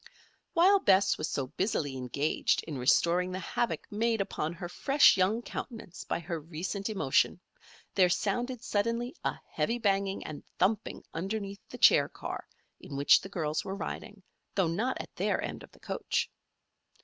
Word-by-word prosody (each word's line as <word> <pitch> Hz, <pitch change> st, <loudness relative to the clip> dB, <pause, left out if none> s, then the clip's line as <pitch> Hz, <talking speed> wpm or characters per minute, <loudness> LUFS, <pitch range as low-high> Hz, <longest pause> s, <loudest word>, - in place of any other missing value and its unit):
While 380 Hz, +3 st, +6 dB
Bess 195 Hz, -, +4 dB
was 155 Hz, -, -2 dB
so 135 Hz, -, -1 dB
busily 145 Hz, -, -1 dB
engaged 130 Hz, +4 st, 0 dB
in 150 Hz, -5 st, -5 dB
restoring 175 Hz, +8 st, +3 dB
the 185 Hz, -, -3 dB
havoc 235 Hz, +5 st, -2 dB
made 225 Hz, +2 st, +1 dB
upon 195 Hz, -5 st, -2 dB
her 175 Hz, +1 st, -6 dB
fresh 275 Hz, +11 st, +5 dB
young 200 Hz, +5 st, +2 dB
countenance 225 Hz, -9 st, -7 dB
by -, -, -1 dB
her 170 Hz, 0 st, -4 dB
recent 175 Hz, +6 st, -4 dB
emotion, 180 Hz, -5 st, +2 dB, 0.5 s
there 185 Hz, -2 st, +5 dB
sounded 240 Hz, +7 st, -1 dB
suddenly 230 Hz, +4 st, 0 dB
a -, -, -1 dB
heavy 235 Hz, -, 0 dB
banging 195 Hz, -3 st, 0 dB
and 155 Hz, -2 st, -7 dB
thumping 205 Hz, +3 st, 0 dB
underneath 200 Hz, +2 st, -4 dB
the -, -, -8 dB
chair -, -, +6 dB
car -, -, -6 dB, 0.3 s
in 140 Hz, -, -9 dB
which 140 Hz, 0 st, +6 dB
the 195 Hz, -, -8 dB
girls 155 Hz, -5 st, -1 dB
were 190 Hz, -, -4 dB
riding, 200 Hz, 0 st, -6 dB, 0.3 s
though 190 Hz, -4 st, +3 dB
not 225 Hz, +10 st, -1 dB
at -, -, -8 dB
their -, -, +1 dB
end -, -, -4 dB
of -, -, -13 dB
the -, -, -20 dB
coach. -, -, -2 dB
195 Hz, 160 wpm, -30 LUFS, 165-220 Hz, 0.5 s, While